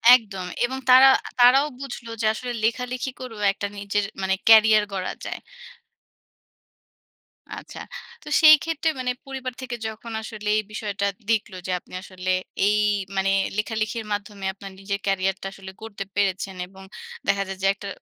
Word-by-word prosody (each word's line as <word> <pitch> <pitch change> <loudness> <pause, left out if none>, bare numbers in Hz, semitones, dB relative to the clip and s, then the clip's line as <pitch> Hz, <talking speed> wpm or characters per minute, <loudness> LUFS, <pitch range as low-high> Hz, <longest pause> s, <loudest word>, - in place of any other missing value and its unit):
একদম 195 -6 -3 0.2
এবং 260 +2 -4
তারা 260 +1 +9 0.3
তারাও 265 +4 +7
বুঝলো 245 -4 -7
যে - - 0
আসলে 245 +2 -5
লেখালেখি 250 +3 -1
করেও 225 -5 -8
একটা 200 +1 -4
নিজের 200 0 -1 0.2
মানে 190 0 +1
কেরিয়ার 220 -1 +7
গড়া 185 -1 -3
যায়। - - -5 2.2
আচ্ছা। - - -10 0.4
তো - - -16
সেই 310 -1 +10
ক্ষেত্রে 325 -1 0
মানে 250 0 0
পরিবার 260 -2 -5
থেকে 250 -2 -4
যখন 220 +1 -8
আসলে 215 -1 -7
এই - - +2
বিষয়টা 205 -2 -3 0.2
দেখলো 215 -4 0
যে - - -1
আপনি - - -20
আসলে 185 -1 -6 0.4
এই 210 0 +3 0.4
মানে, 195 0 +2 0.3
লেখালেখির 215 +1 -2
মাধ্যমে 205 -1 -5
আপনার 195 0 -10
নিজের 200 0 -3
কেরিয়ার 195 -1 +1
টা 195 - -4
আসলে 190 -1 -10
গড়তে 205 -3 -6
পেরেছেন, 195 -1 0
এবং 190 +1 -14 0.4
দেখা 195 0 +2
যায় 195 0 -6
যে - - +4
একটা 200 0 -9
210 Hz, 155 wpm, -24 LUFS, 195-245 Hz, 2.2 s, সেই